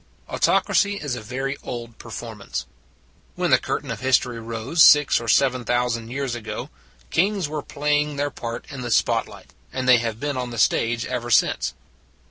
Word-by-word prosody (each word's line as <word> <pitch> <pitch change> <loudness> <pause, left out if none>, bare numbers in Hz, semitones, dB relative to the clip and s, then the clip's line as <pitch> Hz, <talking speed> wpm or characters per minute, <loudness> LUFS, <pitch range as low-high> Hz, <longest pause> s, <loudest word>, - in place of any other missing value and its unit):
Autocracy 205 0 +2
is 145 -9 -4
a 120 - -4
very 135 +5 -3
old 115 -1 -7
performance. 115 -2 -6 0.7
When - - 0
the - - +6
curtain - - -3
of - - -4
history 125 -2 +1
rose 115 +8 -1
six 145 -5 +6
or 115 - -7
seven 130 +2 +3
thousand 120 -1 0
years 135 0 -3
ago, 120 +3 -6 0.4
kings 195 0 +1
were 150 0 -4
play 150 +1 0
ing 150 0 -4
their 145 0 -1
part 115 -2 -6
in 135 -2 -6
the 120 - -4
spot - - +2
light, - - -14 0.2
and 130 -1 -3
they 125 -2 +7
have 115 -1 -3
been 145 0 -2
on 125 -1 -3
the 120 - -7
stage 115 +1 +2
ever 120 -2 -3
since. 115 - +2
125 Hz, 180 wpm, -23 LUFS, 115-140 Hz, 0.7 s, they